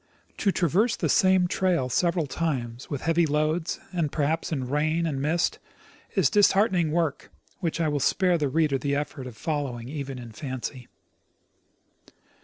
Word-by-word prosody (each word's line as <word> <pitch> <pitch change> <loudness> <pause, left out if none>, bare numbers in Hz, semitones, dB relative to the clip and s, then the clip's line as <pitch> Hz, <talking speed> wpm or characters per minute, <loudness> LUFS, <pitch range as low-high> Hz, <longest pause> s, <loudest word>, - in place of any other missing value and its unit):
To 200 - +2
traverse 190 - +2
the - - -1
same 185 -3 +4
trail 175 -7 +1
several 170 +5 +1
times 130 -6 -3
with 140 -3 -3
heavy 165 +1 +2
loads, 155 +3 0
and 165 -5 0
perhaps 155 +3 -1
in 135 -5 -2
rain 155 +4 +1
and 140 -4 -2
mist, 165 +4 0 0.6
is 190 -8 +4
dis 205 -1 +5
heartening 185 -5 +2
work 160 -3 -1 0.3
which 170 -2 -2
I 165 - +2
will 145 -1 0
spare 180 +4 +2
the 145 -2 0
reader 150 -1 +1
the 140 +1 -1
effort 140 -2 -4
of 120 -4 -10
follow 145 -3 -2
ing 115 +2 -9
even 140 -3 -5
in 120 -2 -9
fancy. 130 0 -6
155 Hz, 165 wpm, -26 LUFS, 135-170 Hz, 0.6 s, dis